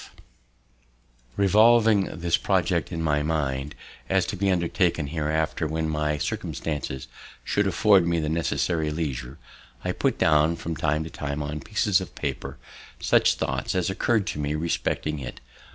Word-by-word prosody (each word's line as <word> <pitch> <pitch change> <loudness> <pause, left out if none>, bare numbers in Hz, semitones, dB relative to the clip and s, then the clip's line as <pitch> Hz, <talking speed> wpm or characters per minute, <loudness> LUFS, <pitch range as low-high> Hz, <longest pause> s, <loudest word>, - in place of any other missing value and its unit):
B. - - -12
F." - - -22 1.2
Revolving 110 +1 +5
this 85 -1 0
project - - 0
in 80 0 -3
my 75 -2 +2
mind, 75 -3 -2 0.3
as - - +2
to - - -4
be 100 +1 0
undertaken 85 -2 +1
hereafter, 80 +1 -1
when 80 +1 -2
my 75 -1 0
circumstances 70 -2 -4 0.4
should 105 -1 +1
afford 100 -3 +4
me 85 -1 +1
the 75 - -1
necessary 80 0 0
leisure, 70 -4 -4 0.5
I - - +1
put - - 0
down 75 +2 +3
from 85 0 -5
time 75 0 0
to 80 - -8
time, 70 0 -4
on 75 +1 -4
pieces 100 +2 +1
of 95 - -8
paper, 70 -4 -4 0.4
such - - +3
thoughts - - -2
as 95 +1 +1
occurr'd 105 +1 +1
to - - -4
me 75 +1 -1
respecting 75 -1 -1
it. 65 - -7
80 Hz, 155 wpm, -25 LUFS, 75-90 Hz, 1.2 s, Revolving